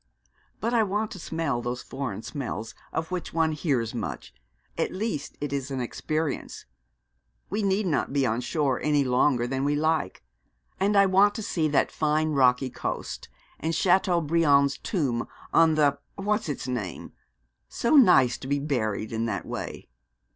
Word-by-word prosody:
'But 235 - -1
I 235 - +4
want 210 +1 -1
to 190 - -7
smell 160 -7 -2
those 120 +1 -4
foreign 120 -6 -5
smells 115 -5 -5 0.2
of 160 +2 -3
which 180 -3 -4
one 160 -1 +3
hears 140 -8 -1
much. 115 -4 -5 0.4
At - - -1
least 185 -7 -4
it 145 -1 -3
is 140 -1 -2
an 135 -1 -3
experience. 155 +4 -3 0.9
We 210 +2 0
need 200 +1 +1
not 160 -6 0
be 140 -1 +2
on 115 0 0
shore 135 +1 0
any 150 -1 +2
longer 125 -1 +2
than 135 +2 -2
we 145 +1 +1
like. 155 -9 0 0.6
And 200 +2 +2
I 200 - +7
want 195 +2 +4
to 220 - -4
see 160 -5 0
that 150 - +2
fine 155 0 +1
rocky 130 -2 +3
coast, - - -5 0.3
and 160 +1 -1
Chateaubriand's 165 -6 +3
tomb 135 - -1 0.3
on 165 -1 +5
the 145 -2 +3 0.2
what's 210 -2 -1
its 140 - -4
name. 115 -9 -4 0.6
So 235 +6 +1
nice 135 - +6
to 130 - -8
be 140 +1 +1
buried 115 -7 -2
in 115 +1 -1
that 100 -3 -3
way.' - - -6
150 Hz, 160 wpm, -26 LUFS, 130-170 Hz, 0.9 s, I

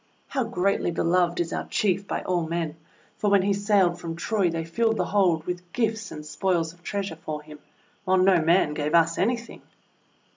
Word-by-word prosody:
How 265 -3 -1
greatly 195 -5 0
beloved 175 +1 +1
is 170 -1 -1
our - - -3
Chief 195 -1 0
by - - -3
all 175 -3 -1
men, 165 -2 -2 0.4
for 210 - +1
when 200 -2 +4
he 200 +1 +2
sailed 195 -4 +2
from 165 -1 -5
Troy 195 +1 0
they 165 -1 -3
filled 225 +7 0
the 180 - 0
hold 175 -4 +2
with 180 0 -5
gifts 220 -3 -1
and 150 -1 -8
spoils 170 0 -1
of 175 - -23
treasure 195 -2 -4
for 155 -2 -6
him, 150 0 -12 0.4
while 185 0 +2
no 185 -2 +4
man 165 -1 +3
gave 150 +2 -1
us 165 0 +3
anything! 235 +3 -1
180 Hz, 190 wpm, -25 LUFS, 165-200 Hz, 0.4 s, when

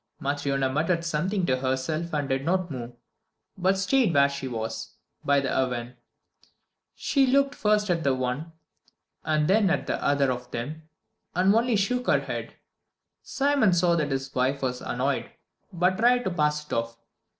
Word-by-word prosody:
Matryona 140 -1 -1
muttered 165 +3 0
something 180 +4 0
to 130 -5 +1
herself 135 +6 -2
and 145 -2 -1
did 135 0 -1
not 180 +1 0
move, 120 -2 -6 0.6
but 190 +1 +1
stayed 215 +2 +2
where 140 0 +5
she 140 -1 -5
was, 110 -2 -5 0.3
by 140 0 +3
the 135 -1 -2
oven. 125 -1 -1 1.0
She 275 -3 +2
looked 275 +2 +3
first 210 -4 +1
at 165 -2 0
the 135 -2 +2
one 130 +6 -3 0.7
and 155 -1 +1
then 200 0 +4
at 185 - 0
the - - -3
other 140 -2 +2
of 125 0 -5
them, 155 +7 -6 0.5
and 185 +3 +4
only 235 +1 +2
shook 250 +5 0
her - - +3
head. - - -6 0.7
Simon 275 -8 +2
saw 175 0 +3
that 155 -3 0
his 135 0 -3
wife 135 +2 0
was 125 -1 -2
annoyed, - - -2 0.4
but 180 +2 +1
tried 245 +2 +4
to 190 - -1
pass 150 -2 0
it - - -8
off. 115 0 -2
155 Hz, 165 wpm, -26 LUFS, 135-190 Hz, 1.0 s, where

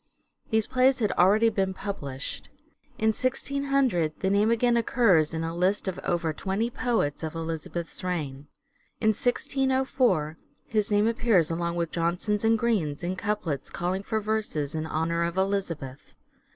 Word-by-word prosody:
These 220 -1 +2
plays 260 +1 +3
had 215 -4 +1
already 210 +6 +4
been 190 -3 -1
published. 145 -9 -5 0.5
In 220 - +2
1600 260 - 0
the 190 - 0
name 205 +2 +3
again 235 +1 +3
occurs 220 -9 +3
in 165 0 -3
a 165 +1 -3
list 185 +4 +1
of 190 - -3
over 165 -2 -1
twenty 200 +8 -2
poets 230 - 0
of 160 0 -4
Elizabeth's 165 +1 -4
reign. 150 -6 -3 0.5
In 220 - +3
1604 250 - +1 0.3
his 215 -2 0
name 205 +1 +3
appears 225 -8 +2
along 170 +1 -2
with 170 -1 -2
Jonson's 180 +5 -1
and 225 0 +4
Green's 190 -11 0
in 180 +2 -1
couplets 185 -8 -2
calling 180 +2 -2
for 220 +2 -1
verses 210 -9 -2
in 160 0 -3
honour 165 +2 -1
of 170 +1 -1
Elizabeth. 175 -9 -2
190 Hz, 150 wpm, -27 LUFS, 165-225 Hz, 0.5 s, already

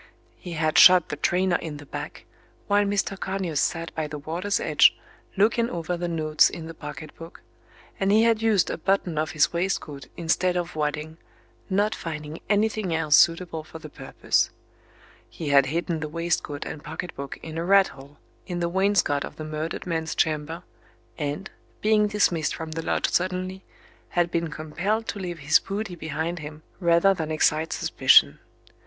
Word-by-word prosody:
He 175 - -7
had 155 -1 +2
shot 180 -2 +8
the - - -3
trainer 180 +4 +1
in 155 -3 -6
the 145 - -11
back - - -7 0.4
while 205 0 +3
Mr. 200 -1 -1
Conyers 190 -6 -2
sat 165 +2 -1
by 155 -1 -3
the 150 0 -6
water's 170 +7 -2
edge - - +4 0.4
looking 230 +3 +3
over 170 +1 -3
the 175 0 -3
notes 155 -2 +3
in 165 - -8
the 165 - -8
pocket 155 -1 -9
book, 165 +2 -12 0.6
and 195 0 +2
he 215 +2 +5
had 230 -1 +3
used 215 -5 +2
a - - -5
button 180 -3 0
off 155 - -2
his 155 +1 +2
waistcoat 170 -5 -3
instead 175 +2 +1
of 175 -1 -3
wadding, 150 +1 -3 0.5
not 205 +3 +1
finding 155 -3 -6
anything 210 -4 +1
else 155 -2 +3
suitable 165 -1 +3
for 160 - -11
the 155 -2 -11
purpose. - - 0 0.8
He 160 -3 -5
had 140 -2 +5
hidden 165 +2 -2
the 155 -1 -4
waistcoat 165 -3 -2
and 150 - -7
pocket 160 +3 -6
book 140 0 -6
in 160 0 -5
a - - -2
rat 195 +2 +5
hole 140 +1 -14 0.3
in 175 -2 -3
the 170 0 0
wainscot 190 -6 +2
of - - -8
the 155 - -7
Page 155 - -7
198 155 0 -3
murdered 165 +3 -5
man's 165 -1 -2
chamber, 160 +2 -1 0.6
and, 145 0 -4 0.3
being 210 0 +3
dismissed 180 -7 +1
from 160 -1 -6
the 165 +1 -3
lodge - - 0
suddenly, 185 +1 -1 0.5
had 175 -1 0
been 170 0 0
compelled 175 +9 -2
to 205 - -4
leave 175 -3 -5
his 150 -1 +4
booty 200 0 -5
behind 160 +2 -4
him 150 0 -9 0.2
rather 170 +2 +4
than 160 -4 -4
excite 155 +1 +1
suspicion. 70 +2 +4
165 Hz, 180 wpm, -25 LUFS, 155-190 Hz, 0.8 s, shot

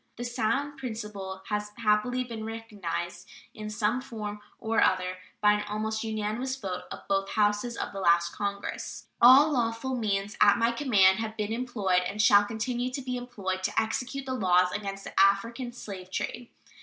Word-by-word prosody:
This 240 0 -5
sound 275 +5 0
principle 210 -6 -6
has 210 0 -1
happily 235 +3 +2
been 230 -3 -6
recognized 210 -6 -5 0.2
in 215 0 -6
some 215 +3 0
form 210 -5 -6 0.2
or 225 0 +1
other 185 0 +2 0.2
by 210 0 +6
an 210 0 -1
almost 220 +1 -2
unanimous 220 +4 -2
vote 190 -8 -5
of - - -8
both 195 0 0
Houses 210 +3 +1
of - - -3
the 195 - -5
last 170 -2 +3
Congress. 200 -1 -4 0.2
All 270 +6 +8
lawful 240 0 0
means 205 -3 -1
at 205 -1 +7
my 230 0 +3
command 210 -7 +4
have 220 -1 -4
been 210 0 -2
employed, 215 -7 +1
and 210 - -6
shall 205 -1 +6
continue 245 +3 -2
to 255 +2 -4
be 250 -1 -3
employed, 205 -7 -4
to - - 0
execute 255 +4 -2
the 260 - -3
laws 180 -6 +3
against 195 -1 -4
the - - -8
African 230 +6 +2
slave 195 -6 -8
trade. 240 +5 -4
215 Hz, 170 wpm, -28 LUFS, 200-240 Hz, 0.2 s, All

